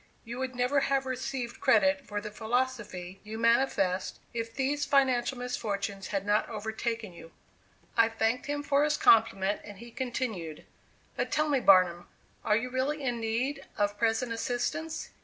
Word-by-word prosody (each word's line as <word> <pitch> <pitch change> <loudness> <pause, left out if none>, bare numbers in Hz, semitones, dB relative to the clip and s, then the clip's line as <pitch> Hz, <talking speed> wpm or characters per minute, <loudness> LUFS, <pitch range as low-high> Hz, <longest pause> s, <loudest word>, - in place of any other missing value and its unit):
You 240 +2 -6
would 260 -1 -3
never 250 +3 +2
have 275 0 +1
received 255 -1 -4
credit 285 +1 +3
for 205 0 -3
the 210 0 -7
philosophy 220 -5 -2
you 220 +1 -7
manifest, 230 -6 +2 0.2
if 230 -1 -3
these 275 +4 -1
financial 265 -3 +2
misfortunes 200 -5 -3
had 195 -1 -2
not 205 +1 +2
overtaken 220 -1 -3
you." 165 -1 -13 0.6
I 230 0 +5
thanked 225 +3 0
him 290 0 -2
for 285 0 +3
his 300 0 +2
compliment, 205 -3 +4
and 205 -1 -10
he 235 +3 -11
continued: 230 - -4 0.5
"But - - -1
tell 305 0 +1
me, 280 -2 +3
Barnum, 185 -5 +5 0.4
are 210 - +3
you 250 +2 -3
really 275 +3 -1
in 245 -3 -1
need 250 +5 -1
of 205 0 0
present 230 +2 +1
assistance? 245 +7 -3
235 Hz, 160 wpm, -29 LUFS, 210-265 Hz, 0.6 s, I